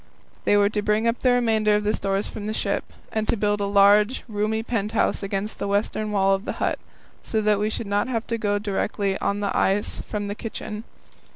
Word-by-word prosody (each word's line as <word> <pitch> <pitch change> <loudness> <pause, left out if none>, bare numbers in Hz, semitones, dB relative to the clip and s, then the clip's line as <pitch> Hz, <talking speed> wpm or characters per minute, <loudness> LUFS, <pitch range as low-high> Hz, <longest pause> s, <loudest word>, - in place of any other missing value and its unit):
They 205 - +4
were 205 0 +5
to 210 - 0
bring 210 +2 +1
up 230 +1 +1
the 255 - +3
remainder 220 -4 +3
of 210 - 0
the 210 +1 +1
stores 195 0 0
from 210 -1 -6
the 215 - -2
ship, - - -1 0.3
and 220 -1 -1
to - - +1
build 205 0 +1
a - - +1
large, 205 +4 +4
roomy 215 0 -1
pent 225 -2 -2
house 225 - +1
against 195 +1 -3
the 200 - -2
western 210 +1 0
wall 195 -1 +3
of 195 +1 -2
the - - -2
hut, - - -1 0.4
so 220 - -1
that 210 -1 +3
we 210 +1 +1
should 220 - -4
not 205 +2 0
have 230 -3 -2
to 230 -1 -2
go 205 -1 +1
directly 200 -1 -1
on 200 - 0
to 205 - -4
the 200 - -1
ice 200 +2 +1
from 210 -1 -2
the 200 - -2
kitchen. 215 0 -6
210 Hz, 230 wpm, -24 LUFS, 200-220 Hz, 0.4 s, were